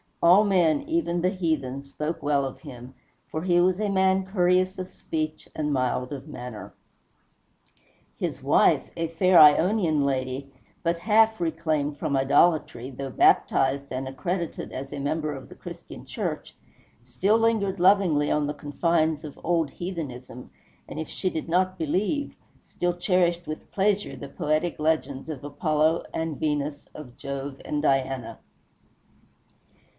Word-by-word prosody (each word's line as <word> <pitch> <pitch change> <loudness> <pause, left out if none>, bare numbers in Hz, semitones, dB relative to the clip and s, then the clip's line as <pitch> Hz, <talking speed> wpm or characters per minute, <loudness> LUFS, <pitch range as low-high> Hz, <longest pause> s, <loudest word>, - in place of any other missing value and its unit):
All 180 +5 +7
men, 185 - +3
even 300 - -1
the 180 - +2
heathen, 155 -8 -2
spoke 150 +4 -5
well 145 -1 +2
of 135 - -7
him, 125 -4 -10 0.4
for 155 - -4
he 175 -1 +3
was 185 +1 +2
a 210 -1 0
man 190 0 +2
courteous 185 0 +1
of 185 0 -6
speech 155 -1 -4
and 150 -1 -1
mild 125 0 -1
of 140 0 -7
manner. 125 -7 -8 1.4
His - - -3
wife, - - +4
a 165 0 -1
fair 175 +2 +4
Ionian 160 +1 +5
lady 135 0 -2 0.3
but 170 0 0
half 220 +3 +3
reclaimed 160 -3 -1
from 140 -1 -1
idolatry, 135 -2 +2
though 135 +1 -6
baptized 135 +2 +2
and 130 +1 -3
accredited 170 +5 -4
as 135 +1 -6
a 145 - -5
member 150 +2 -1
of 135 -2 -9
the - - -12
Christian - - -10
Church, - - -4 0.5
still 180 - +1
lingered 220 -4 +1
lovingly 180 -6 +4
on 150 -1 +1
the 150 - -3
confines 160 +2 0
of 150 -2 -9
old 165 -3 +1
heathenism, 135 -9 -7 0.4
and - - -7
if 160 - -5
she 185 - -2
did 160 - -4
not 185 +2 +1
believe, 200 - -1 0.3
still 175 0 -2
cherished 175 -1 +1
with 155 - -7
pleasure 205 +1 0
the 140 - -8
poetic 155 +4 -1
legends 150 -2 -1
of 145 -4 -6
Apollo 155 +2 +1
and 160 -3 -3
Venus, 145 -1 -2
of 125 -5 -11
Jove 140 0 -5
and 150 0 -2
Diana. 135 -4 0
155 Hz, 145 wpm, -26 LUFS, 140-180 Hz, 1.4 s, All